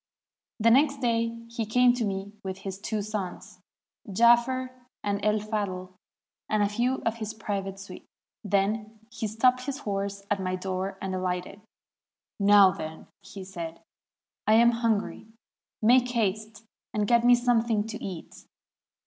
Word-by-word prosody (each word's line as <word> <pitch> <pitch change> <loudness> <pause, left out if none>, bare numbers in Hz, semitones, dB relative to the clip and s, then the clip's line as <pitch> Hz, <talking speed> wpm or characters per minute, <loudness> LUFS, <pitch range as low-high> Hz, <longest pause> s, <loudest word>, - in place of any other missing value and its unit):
The 230 +1 +4
next 280 +2 +4
day 230 -1 -1
he 230 0 -3
came 250 +2 +4
to 245 -1 -2
me 195 0 -4
with 190 -1 -4
his 190 0 -7
two 210 0 -3
sons, 200 -2 -6 0.5
Jaafer 240 +4 +4 0.3
and 200 0 -2
El 210 +1 +3
Fadhl, 200 -4 -3 0.6
and 215 -1 +2
a 200 - +1
few 240 +5 -1
of 225 0 0
his 220 -1 -5
private 195 -2 -4
suite. 195 0 -11 0.4
Then 210 +2 -1
he 220 - -3
stopped 250 +4 +2
his 275 -1 -2
horse 200 -2 -3
at 200 -1 +1
my 185 0 -1
door 190 +1 -3
and 190 -1 -3
ahghted. 185 +2 -3 0.8
'Now, 200 -1 +7
then/ 160 -2 -7 0.3
said 185 -4 -7
he, - - -26 0.7
'I 215 - +5
am 235 +1 +6
hungry. 230 -3 -1 0.6
Make 250 +2 +5
haste 215 -1 -2 0.3
and 210 -1 +1
get 235 +2 +3
me 245 0 +7
something 235 -3 +1
to 225 0 -7
eat.' 180 -4 -8
210 Hz, 150 wpm, -27 LUFS, 195-230 Hz, 0.8 s, Now